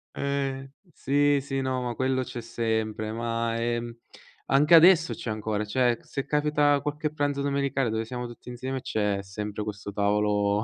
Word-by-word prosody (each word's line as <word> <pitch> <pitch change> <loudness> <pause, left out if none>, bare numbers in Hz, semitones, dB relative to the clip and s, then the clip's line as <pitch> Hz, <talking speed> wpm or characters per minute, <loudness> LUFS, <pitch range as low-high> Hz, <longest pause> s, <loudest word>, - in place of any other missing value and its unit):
Eh, 135 -1 -2 0.2
sì, 145 0 +2
sì, 135 0 -3
no, 130 -1 -1
ma 120 -1 -2
quello 130 +1 0
c'è 120 - -6
sempre, 110 -2 -2
ma, 115 0 -2
ehm, 120 0 -2 0.5
anche 145 +4 +4
adesso 165 0 +7
c'è 115 - -6
ancora, 105 0 -2
cioè, 120 +2 +2
se 135 - -5
capita 150 -1 +2
qualche 150 +1 -3
pranzo 145 -2 -1
domenicale 140 -3 0
dove 110 0 -1
siamo 125 +1 -5
tutti 120 +1 -10
insieme 130 +2 -4
c'è 105 -5 -1
sempre 105 +2 -5
questo 100 -1 -6
tavolo 105 0 +1
125 Hz, 160 wpm, -27 LUFS, 110-140 Hz, 0.5 s, adesso